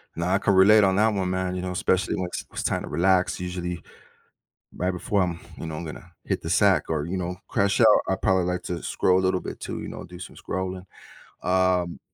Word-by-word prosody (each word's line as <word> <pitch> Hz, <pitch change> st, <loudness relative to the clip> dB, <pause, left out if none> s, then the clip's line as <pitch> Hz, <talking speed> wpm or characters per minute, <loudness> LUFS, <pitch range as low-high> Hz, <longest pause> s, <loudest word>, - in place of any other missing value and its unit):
Now 90 Hz, +2 st, -1 dB
I -, -, +5 dB
can 100 Hz, -1 st, +1 dB
relate 105 Hz, +3 st, +7 dB
on 95 Hz, -1 st, +3 dB
that 110 Hz, +1 st, +3 dB
one, 95 Hz, -2 st, -1 dB
man, 95 Hz, 0 st, -1 dB
you 90 Hz, -, -3 dB
know, 90 Hz, -, -3 dB
especially 95 Hz, +1 st, 0 dB
when 90 Hz, -, -2 dB
it's -, -, -6 dB
it's -, -, -4 dB
time -, -, -1 dB
to -, -, -7 dB
relax, 90 Hz, +1 st, +2 dB
usually, 90 Hz, -1 st, -4 dB, 1.0 s
right 90 Hz, +1 st, 0 dB
before 95 Hz, +2 st, 0 dB
I'm 85 Hz, -2 st, -2 dB, 0.2 s
you -, -, -6 dB
know, 80 Hz, -1 st, -5 dB
I'm 85 Hz, -, -6 dB
gonna 90 Hz, +3 st, -9 dB
hit -, -, -2 dB
the 80 Hz, -, -4 dB
sack 95 Hz, -4 st, +4 dB
or, 75 Hz, -2 st, -1 dB
you 95 Hz, +3 st, -3 dB
know, 90 Hz, 0 st, -3 dB
crash 100 Hz, +2 st, +1 dB
out, 115 Hz, -, +7 dB, 0.2 s
I 95 Hz, -, +1 dB
probably 95 Hz, -3 st, +2 dB
like 90 Hz, 0 st, -2 dB
to 85 Hz, -2 st, -4 dB
scroll 90 Hz, 0 st, +2 dB
a -, -, -2 dB
little 95 Hz, 0 st, +1 dB
bit -, -, -7 dB
too, -, -, -5 dB
you -, -, -7 dB
know, -, -, -7 dB
do 90 Hz, +1 st, -11 dB
some 90 Hz, -, -10 dB
scrolling. 95 Hz, 0 st, -4 dB, 0.6 s
Um, 90 Hz, -1 st, +1 dB
90 Hz, 235 wpm, -25 LUFS, 90-95 Hz, 1.0 s, relate